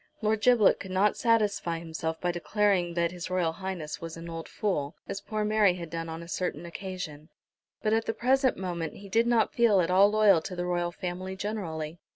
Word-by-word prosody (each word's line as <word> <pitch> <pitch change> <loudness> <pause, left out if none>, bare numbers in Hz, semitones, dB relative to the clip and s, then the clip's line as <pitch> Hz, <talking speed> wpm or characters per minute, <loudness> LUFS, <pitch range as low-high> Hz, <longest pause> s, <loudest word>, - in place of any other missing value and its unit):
Lord 215 0 +1
Giblet 235 -2 +5
could 190 - -8
not 190 +3 +2
satisfy 210 -7 +1
himself 160 -1 -4
by 180 - 0
declaring 180 -1 +1
that 170 0 +1
H.R.H. 180 -1 -3
was 165 0 -6
an 165 +1 -8
old 165 0 -6
fool, 160 -7 -2
as 195 - -4
poor 215 -1 -2
Mary 210 -3 +4
had 170 -3 -7
done 165 0 -4
on 165 +1 -6
a - - -11
certain 175 -2 -3
occasion, 170 -4 -7 0.5
but 215 0 +2
at 225 0 +2
the 225 - -1
present 260 +1 +2
moment 175 -3 -4
he 200 0 -11
did 230 +4 +3
not 235 -2 +2
feel 230 -5 +4
at 180 0 +1
all 195 +2 +6
loyal 210 -5 +5
to 180 - -6
the 175 0 -2
Royal 175 -1 0
Family 185 +2 -5
generally. 175 -6 -4
185 Hz, 195 wpm, -28 LUFS, 170-210 Hz, 0.5 s, all